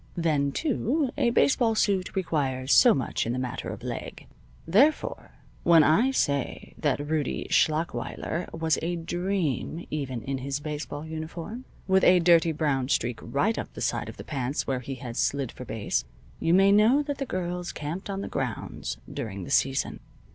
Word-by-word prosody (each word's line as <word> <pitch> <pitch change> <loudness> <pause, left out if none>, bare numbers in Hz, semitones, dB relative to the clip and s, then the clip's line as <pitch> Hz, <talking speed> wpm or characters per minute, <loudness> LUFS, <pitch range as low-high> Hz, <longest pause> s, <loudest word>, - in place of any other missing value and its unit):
Then 150 -4 +1
too, 280 - 0
a 265 -5 +2
baseball 235 -2 +3
suit 195 -3 +1
requires 140 -7 0
so 245 - +7
much 130 -3 -1
in 120 - 0
the - - -2
matter 125 -2 -4
of - - -7
leg. - - -6 0.4
Therefore, 265 - +2 0.3
when 165 -2 +6
I 195 - +4
say 140 - -1
that 145 0 0
Rudie 150 -3 -1
Schlachweiler 160 +1 0
was 160 -1 0
a 175 +2 -1
dream 175 -2 -2
even 130 -6 -3
in 135 +3 -3
his 135 +2 -3
baseball 150 0 -5
uniform, 165 +9 -6 0.2
with 190 -1 +4
a 180 - +7
dirty 170 -1 +5
brown 145 -4 0
streak 120 -4 0
right 205 +11 0
up - - -6
the - - -7
side - - -1
of - - -10
his - - -9
pants 135 -1 -2
where 130 -2 -1
he 135 +2 -6
had 125 -3 -7
slid 140 -3 0
for 125 - -9
base, 110 - -1 0.4
you 165 - +3
may 195 +1 +6
know 225 +8 +5
that 285 -1 -4
the 275 - -1
girls 180 -2 -3
camped 165 +7 -5
on 195 0 -3
the - - -4
grounds - - -4 0.2
during 100 -4 -5
the - - -7
season. 135 0 +1
160 Hz, 175 wpm, -27 LUFS, 140-190 Hz, 0.4 s, so